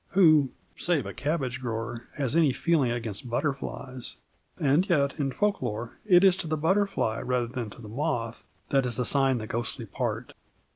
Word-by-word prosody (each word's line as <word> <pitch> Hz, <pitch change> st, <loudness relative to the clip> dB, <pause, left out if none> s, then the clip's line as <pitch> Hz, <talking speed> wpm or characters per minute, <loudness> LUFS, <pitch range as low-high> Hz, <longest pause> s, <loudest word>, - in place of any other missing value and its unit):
Who 155 Hz, -7 st, +6 dB, 0.3 s
save 165 Hz, -, 0 dB
a 100 Hz, -, -5 dB
cabbage 135 Hz, -4 st, -2 dB
grower 115 Hz, 0 st, -4 dB
has 140 Hz, -1 st, -1 dB
any 160 Hz, -5 st, +4 dB
feeling 155 Hz, -4 st, +2 dB
against 115 Hz, -1 st, -4 dB
butterflies? 130 Hz, -1 st, -3 dB, 0.4 s
And 150 Hz, +7 st, +3 dB
yet 140 Hz, -5 st, +3 dB
in 135 Hz, -2 st, 0 dB
folk 205 Hz, +7 st, 0 dB
lore 115 Hz, -1 st, -4 dB
it 180 Hz, -2 st, +7 dB
is 190 Hz, -2 st, +7 dB
to 170 Hz, -, -4 dB
the 155 Hz, 0 st, 0 dB
butterfly 165 Hz, -, +1 dB
rather 125 Hz, -1 st, 0 dB
than 120 Hz, -2 st, -5 dB
to 120 Hz, -, -12 dB
the -, -, -8 dB
moth 115 Hz, -2 st, -2 dB, 0.3 s
that 135 Hz, -2 st, +2 dB
is 120 Hz, -, -1 dB
assigned 135 Hz, 0 st, +3 dB
the 110 Hz, -, -5 dB
ghostly 115 Hz, +1 st, -3 dB
part. -, -, -3 dB
135 Hz, 175 wpm, -27 LUFS, 120-155 Hz, 0.4 s, it